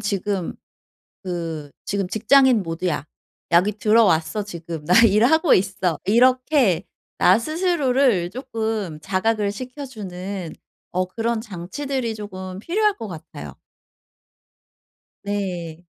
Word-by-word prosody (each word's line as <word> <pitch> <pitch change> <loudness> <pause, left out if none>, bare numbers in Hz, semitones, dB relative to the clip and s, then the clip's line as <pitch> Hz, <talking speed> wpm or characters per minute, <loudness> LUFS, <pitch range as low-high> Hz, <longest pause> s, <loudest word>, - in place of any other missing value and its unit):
지금 200 -2 -2 0.7
그 165 -5 -5
지금 200 -2 -2
직장인 240 +3 +4
모드야. 165 -2 -3 0.5
여기 180 +5 +4
들어왔어 210 -3 +2
지금. 170 -5 -7
나 180 - +3
일하고 245 - +4
있어." 185 -3 0
이렇게 250 - +3 0.3
나 185 +4 +5
스스로를 275 - +1
쪼끔 220 - -3
자각을 200 +2 0
시켜주는 205 - -7 0.4
어 185 +1 +1
그런 225 +4 -2
장치들이 230 +5 -4
쪼금 185 -3 -7
필요할 415 - +1
것 225 -2 -6
같아요. 155 - -9 1.7
네. 180 -5 -4
205 Hz, 220 characters per minute, -22 LUFS, 180-235 Hz, 1.7 s, 나